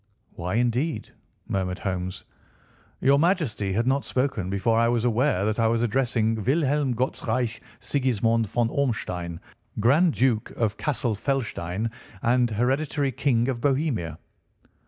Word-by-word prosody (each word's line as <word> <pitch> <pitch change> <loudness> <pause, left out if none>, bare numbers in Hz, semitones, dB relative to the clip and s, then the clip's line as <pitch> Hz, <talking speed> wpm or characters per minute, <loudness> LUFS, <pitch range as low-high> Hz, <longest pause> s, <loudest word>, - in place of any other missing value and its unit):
"Why, 90 +4 -3
indeed?" 125 +7 0 0.4
murmured 95 -1 -1
Holmes. 90 -1 -4 0.8
"Your 140 +2 +4
Majesty 155 - +1
had 115 +4 +1
not 135 +2 +2
spoken 125 -8 -1
before 110 +4 +1
I 115 - +4
was 120 0 +1
aware 120 -4 +2
that 110 +1 0
I 115 - +4
was 115 +1 +1
addressing 115 -2 +1
Wilhelm 140 -1 +1
Gottsreich 125 -1 -1 0.2
Sigismond 115 -4 +1
von 115 +2 0
Ormstein, 90 -11 -2 0.4
Grand 145 - +4
Duke 120 -4 +1
of 110 -2 0
Cassel 120 -5 -1
Felstein, 110 -4 -2 0.3
and 120 0 +3
hereditary 135 +5 0
King 120 -2 +1
of 125 -3 -2
Bohemia." 130 - 0
120 Hz, 130 wpm, -25 LUFS, 110-135 Hz, 0.8 s, Your